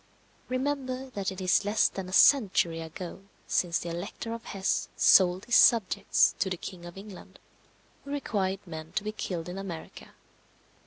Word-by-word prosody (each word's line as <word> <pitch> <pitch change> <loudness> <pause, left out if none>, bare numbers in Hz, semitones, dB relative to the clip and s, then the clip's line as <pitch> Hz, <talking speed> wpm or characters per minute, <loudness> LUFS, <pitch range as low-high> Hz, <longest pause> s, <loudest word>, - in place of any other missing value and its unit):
Remember 260 0 -3
that 200 -4 -3
it 190 - -8
is 185 +2 +2
less 205 +2 +3
than 190 -1 -6
a - - -9
century 190 - +4
ago 170 +3 -8 0.2
since 170 -2 0
the 170 - -5
Elector 195 +6 -5
of 230 0 -8
Hesse 195 -1 -1
sold 185 0 +5
his 240 - +1
subjects 225 -6 +4
to 190 - 0
the 180 - -3
King 175 -1 -9
of 175 - -12
England, 195 -1 -12 0.7
who 280 - -12
required 205 -9 -2
men 160 -2 -9
to - - -1
be 215 - -3
killed 180 -5 -5
in 180 +2 -6
America. 175 -5 -9
195 Hz, 165 wpm, -28 LUFS, 180-225 Hz, 0.7 s, sold